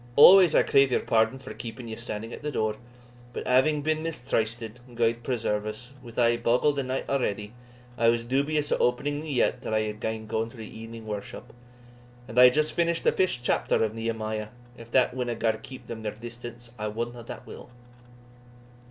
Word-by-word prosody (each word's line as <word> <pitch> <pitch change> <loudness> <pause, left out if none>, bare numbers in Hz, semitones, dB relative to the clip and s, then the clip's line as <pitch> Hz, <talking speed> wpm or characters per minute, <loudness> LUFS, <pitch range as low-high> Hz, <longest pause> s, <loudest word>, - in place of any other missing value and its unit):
Always, 180 +2 +9
I - - +6
crave 135 -1 +4
your - - +2
pardon 110 +3 +2
for 130 - -9
keeping 120 +1 -7
ye 110 - -5
standing 115 0 -6
at - - -8
the 150 - -3
door, 110 -4 -1 0.6
but - - -5
having 145 +4 +3
been 155 0 0
mistrysted 120 -6 -2 0.2
(gude 115 0 +1
preserve 110 -4 -1
us!) 125 +5 -7
with 120 -2 -12
ae 120 -1 +4
bogle 120 +5 +3
the 140 - -1
night 130 0 -3
already, 105 -6 -1 0.5
I 115 - +4
was 115 0 +3
dubious 145 +4 0
o' - - +3
opening 145 +4 0
the 155 - -7
yett 130 -4 +1
till 110 - -2
I 110 - +3
had 105 0 -4
gaen 110 0 -3
through 110 +1 -1
the 110 -1 -10
e'ening 115 0 -9
worship; 105 -2 -7 0.7
and 115 - 0
I 125 - +10
had 125 - +7
just 155 +2 +1
finished 170 0 +1
the - - +4
fifth 185 -10 +1
chapter 120 - +1
of 110 -1 -1
Nehemiah 110 -1 -3 0.3
if 115 -2 -12
that 125 +1 +3
winna 125 -2 -2
gar 115 0 +2
them 110 0 -9
keep 130 +2 -10
their 115 - -6 0.2
distance, 120 +1 -9
I 105 - -2
wotna 120 +2 -4
what - - -9
will." - - -11
120 Hz, 195 wpm, -27 LUFS, 110-130 Hz, 0.7 s, I